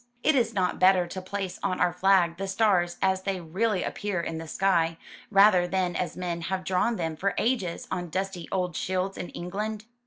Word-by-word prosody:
Is 275 -6 +3
it - - -14
not 185 -2 0
better 185 -1 +5
to 185 +2 -6
place 190 0 -5
on 185 -2 -1
our 175 - +2
flag 180 -2 +3
the 195 +1 -3
stars 190 -4 +2
as 190 0 +2
they 190 -1 -2
really 185 +4 -1
appear 205 -4 -3
in 165 -1 -3
the 165 - -7
sky, 165 -2 +1 0.3
rather 195 -3 +5
than 180 -1 -1
as 180 -2 -3
men 175 -2 -3
have 185 +2 -3
drawn 190 +6 +1
them 165 -4 -3
for 195 +5 -1
ages 220 -8 -1
on 175 -2 -3
dusty 185 -1 -3
old 180 -3 -1
shields 185 +1 -1
in 175 - -6
England?'' 210 +4 -4
185 Hz, 195 wpm, -27 LUFS, 175-195 Hz, 0.3 s, better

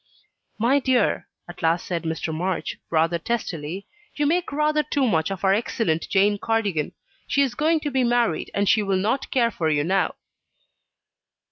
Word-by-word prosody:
"My 245 +6 +3
dear," 260 -2 +1 0.2
at 175 - -10
last 165 +1 +1
said 170 -2 -3
Mr. 160 0 -2
March, 180 +2 -2
rather 165 +1 +2
testily, 180 -4 -3 0.3
"you 295 - 0
make 345 +4 +1
rather 300 +1 +2
too 285 -3 0
much 160 -6 +1
of 195 -1 -5
our 190 - +5
excellent 200 -6 -1
Jane 205 +1 +3
Cardigan. 205 -10 -1 0.3
She 280 - +3
is 265 -3 -1
going 315 +4 +1
to 290 - -3
be 260 -1 +2
married, 240 -8 +1
and 200 0 +1
she 215 - +4
will 195 -2 0
not 220 +8 -1
care 235 -3 +2
for 160 -6 -1
you 145 -1 +2
now." 190 +5 +1
205 Hz, 170 wpm, -24 LUFS, 170-255 Hz, 0.3 s, our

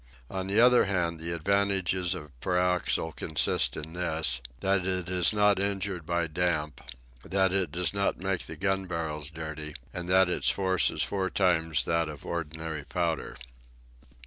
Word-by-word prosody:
On 95 0 -3
the 100 +3 +2
other 125 +1 +6
hand, 85 -4 -1
the 85 +1 -4
advantages 95 0 +1
of 75 -5 -9
pyroxyle 90 -2 +1
consist 80 -2 +1
in 80 +2 -7
this, 80 -8 +1 0.2
that 95 -1 +2
it 90 -1 -1
is 90 -2 +4
not 105 -2 +3
injured 100 -4 -2
by 85 -1 +1
damp, 75 -3 -1 0.4
that 95 +2 +1
it 95 -6 0
does 90 +3 -1
not 100 0 0
make 95 -1 -2
the 80 - -6
gun 95 +3 -1
barrels 80 -4 -4
dirty, 75 -2 -7 0.2
and 90 0 -5
that 95 0 +5
its 90 - +1
force 95 -2 +2
is - - 0
four 95 -2 -1
times 80 -7 +1
that 85 -1 +1
of 75 -2 -9
ordinary 80 -2 -4
powder. 85 +1 -2
90 Hz, 160 wpm, -28 LUFS, 80-95 Hz, 0.4 s, other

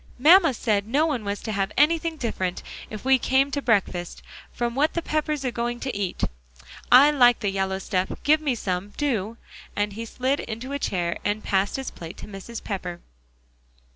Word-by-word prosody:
"Mamma 325 +5 +7
said 210 -3 0
no 285 +7 +2
one 280 -8 -1
was 200 0 -3
to 220 - -4
have 195 -2 -1
anything 325 +2 +2
different, 190 -9 -3 0.3
if 215 +2 -8
we 265 -1 +5
came 270 +3 +2
to 285 - -1
breakfast, 195 -7 0 0.3
from 240 -1 -2
what 290 +5 +1
the 340 - 0
Peppers 305 -3 -1
are 250 - 0
going 240 0 -3
to 265 -3 -4
eat. 195 -3 -3 0.7
I 270 +4 +8
like 245 -5 +5
the 205 -3 0
yellow 190 0 -1
stuff; 190 -1 -1
give 305 +2 +4
me 280 -5 0
some, 195 -1 -3
do," 230 -6 -1 0.4
and 205 0 -1
he 225 +3 -5
slid 260 +5 -1
into 235 +4 -6
a 280 - -2
chair 175 -8 -1
and 205 +1 -1
passed 195 0 0
his 265 -1 -4
plate 165 -1 -9
to - - -9
Mrs. 210 +3 -8
Pepper. 180 -4 -5
235 Hz, 190 wpm, -25 LUFS, 200-275 Hz, 0.7 s, I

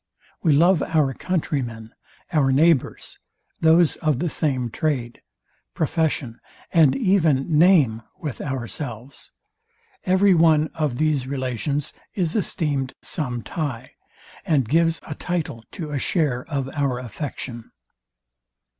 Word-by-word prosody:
We 160 -5 +3
love 170 +2 +4
our 150 -4 +1
country 160 -3 -1
men, 115 -2 -8 0.4
our 140 -4 +3
neighbours, 150 +1 +1 0.4
those 160 0 +4
of 155 -4 0
the 165 +4 -2
same 130 -6 -1
trade, 125 -6 -2 0.5
profession, 150 -6 -1 0.3
and 160 -6 +5
even 165 - +2
name 155 - +5 0.2
with 155 - -5
ourselves. 130 -1 -6 0.7
Every 190 0 +4
one 160 -2 +4
of 150 -6 -1
these 150 -4 +1
relations 135 +2 -2 0.2
is 175 -5 -1
esteemed 145 -10 -1
some 125 -6 -3
tie, 130 -6 -4 0.5
and 140 -7 +1
gives 165 +3 +2
a 150 - -5
title 155 -8 -3
to 160 -6 -6
a 145 - -1
share 140 -6 0
of 140 -4 -3
our 140 -3 -1
affection. 125 -1 -6
145 Hz, 120 wpm, -23 LUFS, 130-165 Hz, 0.7 s, and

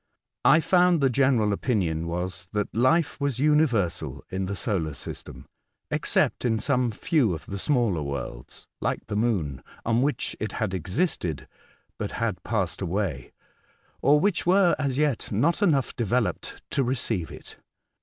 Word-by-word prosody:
I 145 +6 +7
found 180 -1 +4
the 135 -2 +3
general 120 -5 +3
opinion 85 - -1
was 90 +1 -3
that 105 -1 -1
life 145 +7 +2
was 140 -4 0
universal 115 - +1
in 95 0 -2
the 100 - -3
solar 85 - -2
system, - - -8 0.5
except - - +1
in 115 -3 +2
some 125 +2 +1
few 115 - +1
of 80 - -10
the 100 - -5
smaller 115 - +1
worlds 70 -4 -6
(like - - -2
the 105 - -4
moon) 95 - 0 0.2
on 115 +1 +2
which 145 +2 -1
it 110 - -3
had 110 -4 -2
existed, 90 - -1 0.5
but - - -3
had 115 -5 -2
passed 95 -6 -2
away, 90 -8 -2 0.7
or 145 +1 +5
which 195 +1 +1
were, 180 0 +4
as 140 -3 -1
yet, 145 -5 0
not 145 - +1
enough 145 -10 +2
developed 120 0 -1
to 135 - +1
receive 115 -8 -1
it. - - -12
115 Hz, 150 wpm, -26 LUFS, 90-140 Hz, 0.7 s, I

